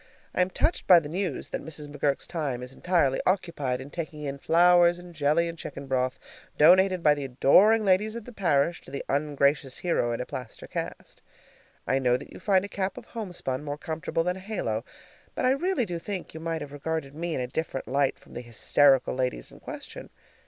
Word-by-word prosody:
I - - +2
am 180 - +2
touched 320 - 0
by 180 -2 +9
the 155 - -7
news 175 -2 -3
that - - -4
Mrs. 150 -2 -6
McGurk's 145 -1 -1
time 140 -7 -3
is 125 +1 -8
entirely 165 -7 +1
occupied 165 -9 0
in 135 +2 -9
taking 155 -3 -6
in 140 -1 -4
flowers 175 +2 +5
and 175 0 -12
jelly 155 +2 +2
and 170 - -5
chicken 140 -3 -7
broth, 130 -1 0 0.4
donated 185 +3 +5
by 150 - +6
the 145 -1 -4
adoring 200 - +5
ladies 205 +3 +2
of 235 -2 -7
the 245 - -10
parish 170 -4 +1
to - - -15
the 140 +1 -5
ungracious 140 -1 +1
hero 165 -9 0
in 115 - -2
a 125 - -3
plaster 125 -3 -7
cast. - - -6 0.6
I 135 - +1
know 125 -2 +2
that - - -12
you - - -10
find 195 -2 +2
a - - -5
cap 195 +1 -3
of 250 - -9
homespun 180 - -4
more 145 -1 -4
comfortable 160 +1 -2
than 180 +2 -1
a - - -8
halo, 185 - -3 0.5
but - - -1
I 255 - +5
really 295 -2 +1
do 175 -3 -4
think 190 +1 -5
that - - -13
you 160 - -7
might 165 -1 -3
have 145 -1 -7
regarded 145 -1 -4
me 165 +2 -3
in - - -2
a 125 - -1
different 135 +1 -4
light 140 0 +1
from - - -18
the - - -5
hysterical 130 +3 +3
ladies 125 - -2
in - - -14
question. - - -9
155 Hz, 215 wpm, -27 LUFS, 135-180 Hz, 0.6 s, by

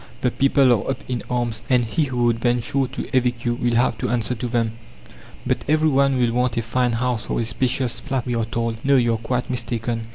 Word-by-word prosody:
The 125 - +1
people 135 -1 +4
are 110 +1 -1
up 135 - -3
in 125 -2 -2
arms, 120 -3 -1
and 125 -2 +3
he 155 +7 0
who 125 -3 -1
would 120 -1 +2
venture 120 +3 0
to 130 - -6
evict 125 -2 +1
you 120 - +2
will 120 0 0
have 120 -2 +2
to - - -1
answer 120 0 0
to 120 +1 -4
them." 115 -2 0 0.7
"But - - 0
every 155 +1 +3
one 140 -1 +3
will 120 -2 +2
want 125 -1 0
a 115 - +1
fine 120 +1 0
house 120 -1 -1
or - - 0
a 115 - 0
spacious 125 +2 -1
flat!" 135 -4 -3
we 125 - -2
are 115 -1 0
told. 115 0 -3
No, 140 0 +4
you 120 -3 +3
are - - 0
quite 125 +2 -2
mistaken. 115 -2 -3
120 Hz, 235 wpm, -22 LUFS, 115-130 Hz, 0.7 s, people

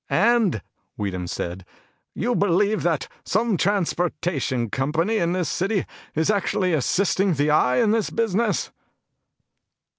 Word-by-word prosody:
"And," 215 - +2 0.3
Weedham 90 -3 -3
said, 90 +2 -4 0.5
"you 240 +6 0
believe 205 +2 +2
that 160 -6 0 0.2
some 220 +1 +1
transportation 170 - -1
company 160 +11 0
in 170 +1 +1
this 180 -3 -1
city 195 +1 -1 0.3
is 160 +6 +2
actually 195 -2 0
assisting 185 +5 +1
the 145 +2 +1
Eye 125 -4 +3
in 210 - +3
this 225 -1 +1
business?" 230 0 0
180 Hz, 120 wpm, -23 LUFS, 150-205 Hz, 0.5 s, Eye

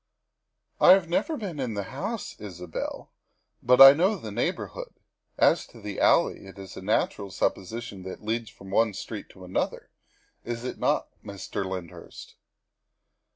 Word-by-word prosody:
" - - -50
I 180 - +11
have 190 -3 +2
never 300 - 0
been 185 -9 -5
in 125 -5 -2
the 100 - -2
house, 215 - -4
Isabel, 90 -5 -6 0.5
but 125 +1 +4
I 135 0 +12
know 185 +8 +2
the 110 - -7
neighborhood. - - -3 0.4
As - - +3
to - - -15
the 105 -2 -6
alley, - - +3
it 95 - -13
is 95 -1 -10
a - - -8
natural 100 0 0
suppo - - 0
sition 105 0 -8
that 95 - -5
it - - -14
leads 115 +1 -2
from 95 -1 -13
one 110 0 +2
street 105 +2 -7
to 95 -1 -13
another, 90 - -3 0.5
is 120 0 -5
it 125 - -5
not, - - +1
Mr. 100 -1 -5
Lyndhurst?" 95 -3 -8
110 Hz, 165 wpm, -27 LUFS, 95-135 Hz, 0.5 s, I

